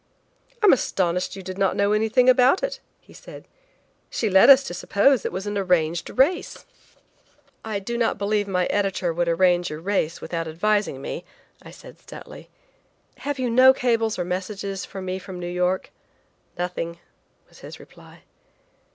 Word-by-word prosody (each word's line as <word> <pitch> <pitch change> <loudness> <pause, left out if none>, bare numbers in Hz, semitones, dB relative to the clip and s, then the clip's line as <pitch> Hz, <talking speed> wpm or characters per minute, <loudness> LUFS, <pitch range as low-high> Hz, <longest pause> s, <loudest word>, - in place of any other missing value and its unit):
"I'm 415 - +7
astonished 180 -7 -1
you 195 - -9
did 185 +1 -7
not 195 -1 +1
know 200 0 +1
anything 220 +4 +2
about 255 - +4
it," - - -3 0.2
he - - -20
said. - - -13 0.6
"She 220 -4 -2
led 190 +7 +6
us 275 0 +8
to 225 - -6
suppose 205 +7 +2
that - - -3
it - - -6
was 190 +2 -5
an 205 0 -2
arranged 175 -3 0
race." 290 +8 0 1.0
"I 220 -2 -3
do 235 +4 -4
not 230 - 0
believe 205 0 -1
my 180 -2 0
editor 195 -4 -1
would 175 +1 -1
arrange 175 +1 +2
a 155 - -6
race 170 -2 -1
without 165 -1 -4
advising 175 -3 -1
me," 170 - -5 0.4
I - - -13
said - - -14
stoutly. - - -12 0.7
"Have 285 0 -4
you 250 -2 -1
no 260 +2 +6
cables 225 -4 0
or 180 - -2
messages 195 +2 -4
for 190 -1 -8
me 185 0 -4
from 185 -1 -9
New 175 - -5
York?" 180 +1 -1 0.7
"Nothing," 175 -1 -4 0.5
was - - -20
his - - -11
reply. - - -17
195 Hz, 170 wpm, -23 LUFS, 180-225 Hz, 1.0 s, us